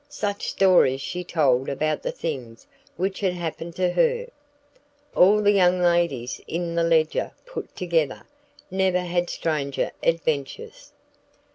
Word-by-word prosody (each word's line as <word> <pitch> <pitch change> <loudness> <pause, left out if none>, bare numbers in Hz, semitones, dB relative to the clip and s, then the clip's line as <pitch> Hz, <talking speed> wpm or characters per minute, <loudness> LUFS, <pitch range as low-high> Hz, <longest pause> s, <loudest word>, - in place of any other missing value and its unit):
Such 205 -8 -3
stories 180 -9 +4
she 180 +6 -4
told 135 -7 +1
about 155 +2 -1
the - - -2
things 125 -8 -6 0.3
which 190 +2 -2
had 190 -3 0
happened 170 -1 -5
to 180 -1 +1
her! 485 - +1 0.9
All 210 +4 +5
the 205 - +5
young 185 -2 +4
ladies 170 -9 +1
in 170 0 -3
The 170 - +1
Ledger 160 -2 +1
put - - -8
together, 165 -6 -1 0.5
never 190 -1 +1
had 175 0 -1
stranger 140 -4 -2
adventures. 160 -4 -2
170 Hz, 130 wpm, -24 LUFS, 155-185 Hz, 0.9 s, All